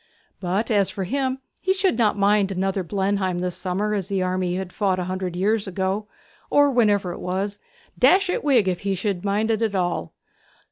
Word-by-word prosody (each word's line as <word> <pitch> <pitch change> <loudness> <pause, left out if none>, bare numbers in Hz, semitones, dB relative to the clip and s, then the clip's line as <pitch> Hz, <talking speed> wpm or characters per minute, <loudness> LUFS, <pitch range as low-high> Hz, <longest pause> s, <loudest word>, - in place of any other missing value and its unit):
But 195 +5 -1
as 200 -3 +3
for 195 - -4
him, 260 +6 -1 0.2
he 380 - +2
should 380 - +2
not 220 -3 +2
mind 200 0 +3
such 195 - -4
another 195 +1 0
Blenheim 190 0 -1
this 180 0 -2
summer 190 +3 -2
as 195 -3 -2
the 195 -2 0
army 185 -1 -1
had 185 -1 -5
fought 195 -3 +1
a 180 - -1
hundred 185 -1 -3
years 205 +3 +1
ago, 190 +3 -2 0.4
or 285 -1 +4
whenever 205 -7 +2
it - - -7
was 195 +3 -3 0.4
dash 390 +1 +5
his 360 - -1
wig 255 -9 +3
if 180 -2 0
he 195 -1 -1
should 190 -1 -2
mind 210 +2 +1
it 220 0 0
at 220 -3 0
all. 175 - -1
195 Hz, 200 wpm, -23 LUFS, 185-215 Hz, 0.4 s, dash